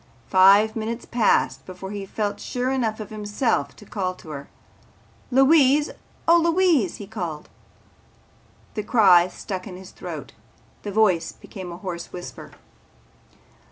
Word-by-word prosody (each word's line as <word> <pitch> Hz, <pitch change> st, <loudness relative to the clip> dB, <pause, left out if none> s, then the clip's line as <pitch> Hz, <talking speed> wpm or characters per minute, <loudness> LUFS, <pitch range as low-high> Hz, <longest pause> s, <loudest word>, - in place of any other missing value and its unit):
Five 200 Hz, +3 st, +6 dB
minutes 230 Hz, +2 st, -4 dB
passed 235 Hz, -3 st, +1 dB
before 185 Hz, +1 st, -8 dB
he 200 Hz, -1 st, -6 dB
felt 205 Hz, 0 st, -3 dB
sure 250 Hz, +1 st, -2 dB
enough 230 Hz, -5 st, -1 dB
of 215 Hz, -1 st, -7 dB
himself 210 Hz, -, -1 dB
to 210 Hz, -, -15 dB
call 185 Hz, -3 st, -3 dB
to 160 Hz, -, -14 dB
her. 140 Hz, -1 st, -7 dB, 0.8 s
"Louise! 275 Hz, +2 st, +4 dB, 0.4 s
Oh, 335 Hz, +1 st, +7 dB
Louise!" 335 Hz, -, +2 dB
he 205 Hz, -, -8 dB
called. 175 Hz, -8 st, -6 dB, 1.2 s
The 215 Hz, -, -2 dB
cry 195 Hz, -5 st, +5 dB
stuck 185 Hz, 0 st, -6 dB
in 180 Hz, -2 st, -8 dB
his 190 Hz, 0 st, -12 dB
throat. -, -, -8 dB, 0.5 s
His 205 Hz, -1 st, -5 dB
voice 185 Hz, -7 st, +2 dB
became 185 Hz, -4 st, -9 dB
a 170 Hz, -, -7 dB
hoarse 175 Hz, -2 st, -6 dB
whisper. 175 Hz, -1 st, -9 dB
205 Hz, 135 wpm, -23 LUFS, 185-235 Hz, 1.2 s, Oh